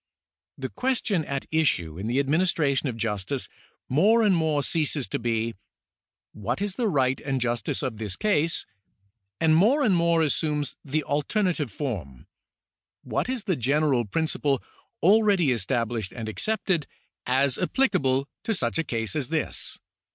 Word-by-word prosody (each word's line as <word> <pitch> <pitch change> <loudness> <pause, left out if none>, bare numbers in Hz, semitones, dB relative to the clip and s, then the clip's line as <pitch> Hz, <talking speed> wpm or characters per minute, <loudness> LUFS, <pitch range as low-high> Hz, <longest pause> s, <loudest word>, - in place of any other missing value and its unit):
The - - -4
question 245 -9 0
at 140 -1 -3
issue 90 - +1
in 100 - -4
the 120 +3 0
administration 145 -1 +1
of 115 - -5
justice 110 +3 -2 0.4
more 210 - +4
and 200 -4 +4
more 155 -3 +1
ceases 150 - 0
to - - -2
be, 115 -1 -1 0.4
" - - -69
What 110 - -3
is 200 -1 -1
the 235 +3 0
right 135 -7 +1
and 135 -2 -1
justice 120 -2 -1
of 120 -4 -3
this 105 -3 -3
case? 165 -6 +1 0.4
" 100 -1 -46
and 160 -1 +4
more 240 - +4
and 210 -8 +4
more 170 -1 +3
assumes 150 -1 -1
the 150 +2 -1
alternative 150 - 0
form, 95 - -5 0.4
" - - -68
What - - 0
is 255 -4 -2
the 190 -5 +1
general 135 -1 +2
principle 145 +2 0 0.4
already 200 -5 +5
established 115 -2 -1
and 115 -3 -6
accepted, 180 - -1 0.4
as 130 +1 +2
applicable 140 - +1 0.2
to 225 - +1
such 120 -2 0
a - - +2
case 115 -3 -2
as 145 -4 -2
this 160 -2 -1
145 Hz, 155 wpm, -26 LUFS, 120-170 Hz, 0.4 s, already